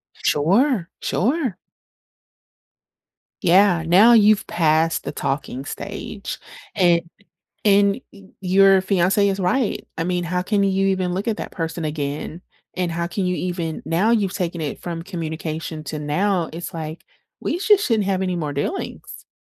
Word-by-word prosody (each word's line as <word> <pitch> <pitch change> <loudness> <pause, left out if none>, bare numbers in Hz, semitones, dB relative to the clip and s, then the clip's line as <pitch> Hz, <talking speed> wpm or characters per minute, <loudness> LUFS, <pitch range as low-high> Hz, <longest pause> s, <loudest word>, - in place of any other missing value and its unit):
Sure, 195 - +2
sure. 255 - 0 1.9
Yeah, 180 -1 +4
now 195 +8 +6
you've 215 -2 +5
passed 160 0 +2
the - - -4
talking 135 -1 -3
stage, - - -6 0.4
and 175 -4 +4 0.6
and 200 +1 +4
y 200 -1 -15 0.2
your 195 +1 +5
fiance 190 +1 +2
is 195 0 -1
right, 215 +6 0
I 165 - 0
mean, 180 0 -1
how 180 +2 -1
can 200 +1 +1
you 195 0 +1
even 185 -2 0
look 195 +5 -2
at 220 - 0
that - - -6
person 165 -1 -4
again? 150 +2 -4 0.3
And 180 -2 -1
how 170 +1 -2
can 190 +1 -2
you 180 - 0
even 170 -3 -3
now 190 +7 +1
you've 200 -5 +1
taken 175 -2 -3
it 145 -3 -4
from 170 -1 -5
communication 160 -3 -5
to 150 +2 -5
now, 175 +4 0
it's 170 +2 -6
like, 160 0 -6 0.4
we 345 - -2
sho 415 +2 +5
shouldn't 230 - +1
have 190 -1 0
any 180 -1 -1
more 150 -3 -3
dealings. 245 - -5
180 Hz, 150 wpm, -22 LUFS, 165-200 Hz, 1.9 s, now